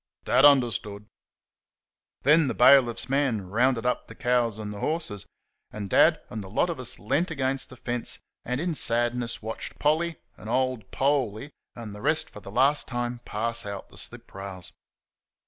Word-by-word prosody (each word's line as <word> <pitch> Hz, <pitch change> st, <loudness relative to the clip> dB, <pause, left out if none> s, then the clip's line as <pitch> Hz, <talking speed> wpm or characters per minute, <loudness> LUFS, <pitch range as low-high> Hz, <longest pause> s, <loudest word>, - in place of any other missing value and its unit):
Dad 135 Hz, -, +5 dB
understood. 110 Hz, -7 st, +3 dB, 1.2 s
Then 150 Hz, +2 st, +5 dB
the -, -, -2 dB
bailiff's 125 Hz, -2 st, +5 dB
man 130 Hz, -7 st, +1 dB
rounded 120 Hz, +4 st, +1 dB
up 125 Hz, -, 0 dB
the -, -, -11 dB
cows 120 Hz, -3 st, +1 dB
and 105 Hz, -1 st, -5 dB
the 100 Hz, -, -8 dB
horses, 150 Hz, -, -2 dB, 0.4 s
and 100 Hz, -2 st, -7 dB
Dad -, -, +5 dB
and 110 Hz, -2 st, -5 dB
the 95 Hz, -, -10 dB
lot 170 Hz, -, +1 dB
of 160 Hz, -, -6 dB
us 130 Hz, -, -5 dB
leant 145 Hz, -, 0 dB
against 135 Hz, -3 st, -2 dB
the 130 Hz, -, -11 dB
fence 120 Hz, -1 st, -3 dB, 0.3 s
and 125 Hz, +1 st, -2 dB
in 170 Hz, +1 st, -1 dB
sadness 120 Hz, -3 st, 0 dB
watched 110 Hz, +1 st, -6 dB
Polly 160 Hz, +2 st, +1 dB, 0.2 s
and 110 Hz, -, -9 dB
old 130 Hz, -4 st, 0 dB
Poley 135 Hz, -2 st, 0 dB, 0.2 s
and 115 Hz, -3 st, -8 dB
the 105 Hz, -, -9 dB
rest 155 Hz, +3 st, 0 dB
for -, -, -10 dB
the 100 Hz, -, -11 dB
last 135 Hz, +7 st, +2 dB
time 120 Hz, -1 st, -3 dB
pass 115 Hz, +2 st, -2 dB
out 100 Hz, -1 st, -7 dB
the -, -, -15 dB
slip -, -, -10 dB
rails. 95 Hz, -2 st, -8 dB
120 Hz, 170 wpm, -26 LUFS, 110-140 Hz, 1.2 s, Dad